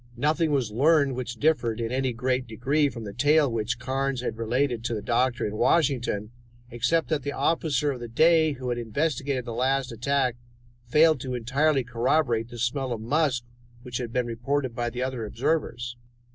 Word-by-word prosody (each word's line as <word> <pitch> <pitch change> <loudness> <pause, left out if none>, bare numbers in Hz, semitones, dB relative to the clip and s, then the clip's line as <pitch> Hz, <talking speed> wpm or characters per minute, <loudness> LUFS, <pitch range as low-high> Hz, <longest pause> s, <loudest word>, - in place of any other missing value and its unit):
Nothing 155 +4 +1
was 135 -7 0
learned 140 +3 +3
which 125 -1 -4
differed 120 -5 +1
in 115 0 -2
any 130 0 0
great 125 +1 -1
degree 140 +6 +1
from 115 -4 -8
the 100 -2 -7
tale 145 +2 +3
which 115 +1 -1
Carnes 135 0 -2
had 125 - -3
related 120 +1 -1
to 120 - -1
the 105 - -4
doctor 120 +1 +1
in 105 0 -4
Washington, 120 -10 +1 0.4
except 130 +8 +1
that 155 -3 0
the 145 +2 -4
officer 150 -3 +1
of 130 - -6
the 120 - -6
day 160 +5 +4
who 130 -2 -5
had 120 0 -1
investigated 135 +2 -1
the 120 - -5
last 130 +2 0
attack 125 +1 0 0.5
failed 155 +3 +5
to 130 0 -4
entirely 135 +4 +1
corroborate 120 0 +1
the 120 - -9
smell 125 +3 -1
of 115 - -2
musk 130 +1 +1 0.4
which 125 -2 -4
had 120 -2 -4
been 125 0 0
reported 125 +3 -2
by 120 +1 -2
the 125 +1 -3
other 130 -3 -3
observers. 120 +1 -2
125 Hz, 185 wpm, -26 LUFS, 120-140 Hz, 0.5 s, failed